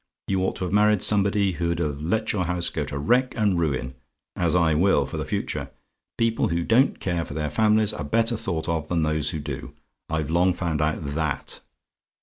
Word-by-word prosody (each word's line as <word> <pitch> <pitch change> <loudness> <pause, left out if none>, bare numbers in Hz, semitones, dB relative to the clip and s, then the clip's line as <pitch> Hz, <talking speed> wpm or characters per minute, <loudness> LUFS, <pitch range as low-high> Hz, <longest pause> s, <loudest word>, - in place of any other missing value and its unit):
You 95 -1 0
ought 95 - -1
to - - -5
have 90 - -3
married 105 -1 +4
somebody 100 -1 +3
who'd 85 -1 -1
have 75 -4 -2
let 110 +8 0
your 95 -4 0
house 90 0 0
go - - -2
to 70 - -5
wreck 125 - +1
and 100 -5 +2
ruin, 65 -5 -1 0.4
as 85 -1 +1
I 85 -3 +3
will 80 -3 +3
for - - -6
the - - -3
future. - - -3 0.5
People 115 -1 +1
who 85 0 -1
don't 125 +8 +3
care 85 -3 -1
for 70 - -8
their 75 -2 -2
families 110 +3 +3
are 75 - -5
better 115 +10 +1
thought 85 -7 -3
of 80 -2 -1
than 85 -1 0
those 75 0 +1
who 80 - -3
do; 70 -2 -6 0.3
I've 80 -1 -2
long 90 +2 +3
found 85 -4 -2
out 75 0 -1
THAT. 70 0 -3
85 Hz, 205 wpm, -24 LUFS, 75-100 Hz, 0.5 s, married